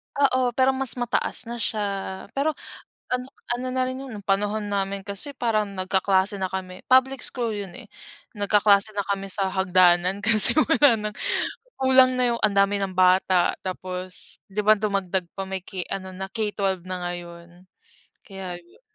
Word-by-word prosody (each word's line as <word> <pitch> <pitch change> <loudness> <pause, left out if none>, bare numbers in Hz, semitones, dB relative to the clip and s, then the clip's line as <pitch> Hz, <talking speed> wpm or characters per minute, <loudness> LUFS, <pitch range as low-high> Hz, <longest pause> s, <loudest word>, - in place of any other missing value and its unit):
Oo 255 -3 +2
pero 260 0 +4
mas 265 -1 +1
mataas 245 0 -1
na 235 0 -7
siya, 200 -4 -3
pero, 295 +2 -1 0.6
ano 250 0 -1 0.3
ano 250 +1 -5
na 255 0 0
rin 255 0 -5
'yon, 220 -7 -9
panahon 205 +2 0
namin 195 0 -2
kasi 200 +8 +1
parang 215 -4 0
nag-kaklase 190 +1 +1
na 190 - -1
kami, 185 -1 -6
public 260 +1 +4
school 240 -3 0
yun 200 -3 -6
eh. 250 -4 -12 0.5
Nag-kaklase 205 0 +3
na 200 - -1
kami 195 -1 -2
sa 195 0 0
hagdanan 185 0 +3
kasi 215 -2 +6
wala 295 -6 +4 0.2
nang - - -22 0.6
kulang 260 -1 +5
na 245 -1 +3
'yong - - -8
ang 210 -2 +2
dami 200 +1 +3
ng 195 - -3
bata 185 -1 +3
tapos, 185 0 -4
'di 205 - -3
ba 215 +1 +6
dumagdag 195 -3 -1
pa 195 - -3
may 190 -1 -5
k 185 -1 -5
ano 190 -1 -4
na 190 +1 -5
K12 200 -4 -2
na 185 0 -4
ngayon? 175 0 -10 0.6
Kaya 190 -3 -7
yun. 170 - -24
200 Hz, 165 wpm, -24 LUFS, 190-235 Hz, 0.6 s, kasi